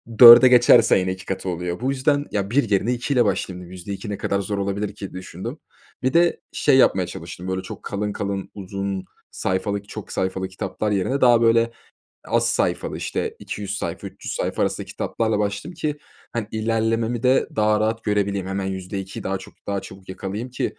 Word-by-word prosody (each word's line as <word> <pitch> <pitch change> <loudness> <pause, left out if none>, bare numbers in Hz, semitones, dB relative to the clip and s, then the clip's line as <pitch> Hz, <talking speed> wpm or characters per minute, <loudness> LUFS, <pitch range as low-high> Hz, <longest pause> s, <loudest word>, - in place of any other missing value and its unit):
ü - - -16
4'e 120 +1 +12
geçerse 120 -3 +6
yine 95 0 -1
2 95 0 -11
katı 95 0 -3
oluyor. 90 0 -3
Bu 130 - +1
yüzden 145 +2 +1
ya 100 -1 -1
1 120 -1 +2
yerine 105 +4 +2
2 125 +4 -2
ile 125 -3 +4
başlayayım 95 -3 -2
dedim. 90 0 -11
%2 100 +4 -6
ne 100 - -3
kadar 100 - -1
zor 100 +1 -3
olabilir 100 +1 -2
ki 100 -2 -8
düşündüm. 95 - -7 0.4
Bir 130 - +1
de 170 0 +3
şey 140 -3 +3
yapmaya 95 -8 +4
çalıştım 85 +1 -8
böyle 95 0 -2
çok - - -9
kalın 105 0 -3
kalın, 100 -1 -3
uzun 95 -1 -4 0.3
sayfalık, 100 +2 -2
çok 110 - -8
sayfalı 95 0 -2
kitaplar 95 +3 -3
yerine 105 +8 0
daha 120 -2 +6
böyle 115 0 +4 0.5
az - - +1
sayfalı - - 0
işte - - -3
200 100 0 -5
sayfa, - - -4
300 - - -7
sayfa - - -1
arasında - - -1
kitaplarla 110 -2 -1
başladım 105 - -2
ki. 155 -3 -3 0.3
Hani, 115 -3 -2
ilerlememi 115 +1 0
de 130 +1 +3
daha 105 0 +3
rahat 110 +1 -1
görebileyim. 100 -2 0
Hemen 95 0 -2
%2'yi 95 0 -5
daha 95 0 -2
çok 95 - -13
daha 100 -1 -1
çabuk 95 0 -12
yakalayayım 100 +6 -5
ki, 125 - -3
100 Hz, 190 wpm, -23 LUFS, 95-115 Hz, 0.5 s, 4'e